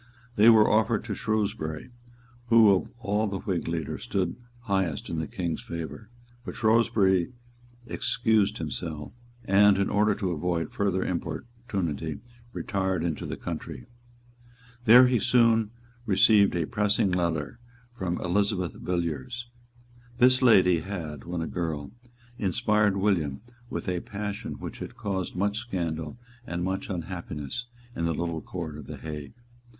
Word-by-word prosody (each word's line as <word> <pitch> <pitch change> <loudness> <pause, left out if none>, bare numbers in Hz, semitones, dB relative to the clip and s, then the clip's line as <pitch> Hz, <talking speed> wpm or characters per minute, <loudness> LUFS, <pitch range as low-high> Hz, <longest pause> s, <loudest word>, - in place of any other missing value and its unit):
They 110 +3 +7
were 110 -2 +7
offered 110 0 +2
to 110 -2 -4
Shrewsbury, 105 -6 -2 0.6
who 115 -3 +7
of 90 - -2
all 105 -2 0
the 100 -1 -3
Whig 95 -5 -2
leaders 80 -3 -3
stood 90 -3 -1 0.3
highest 95 -9 -1
in 80 - -2
the 80 - -3
King's 85 -4 -3
favour; 85 +6 -7 0.3
but - - -7
Shrewsbury 110 -4 +3 0.5
excused 110 -4 +1
himself, 80 -1 -5 0.3
and, 100 +1 +5
in 100 - 0
order 105 0 +3
to 95 -3 -2
avoid 85 -1 -1
further 95 -2 0
importunity, 85 - -3 0.3
retired 95 -6 -1
into 85 -3 -2
the - - -4
country. - - -6 1.0
There 125 +3 +9
he 125 -2 +3
soon 115 -2 +4 0.4
received 100 0 +5
a 85 -2 0
pressing 105 0 +1
letter 85 - -1 0.3
from 95 -6 -3
Elizabeth 90 -1 0
Villiers. 85 - -3 0.7
This 130 +1 +5
lady 95 -8 +6
had, 80 -6 -6
when 85 0 -3
a - - -4
girl, 80 -3 -3 0.5
inspired 105 +1 +2
William 85 -9 0 0.3
with - - -4
a 90 -1 0
passion 105 +3 -5
which - - -8
had - - -7
caused 95 -3 -3
much 100 +3 0
scandal 85 -6 -4 0.3
and 85 0 -3
much 95 +1 -2
unhappiness 85 - -5 0.3
in 85 - -1
the 85 -1 0
little 85 -1 -2
Court 80 -4 -6
of 75 - -10
the - - -7
Hague. 75 +3 -7
95 Hz, 135 wpm, -27 LUFS, 85-105 Hz, 1.0 s, There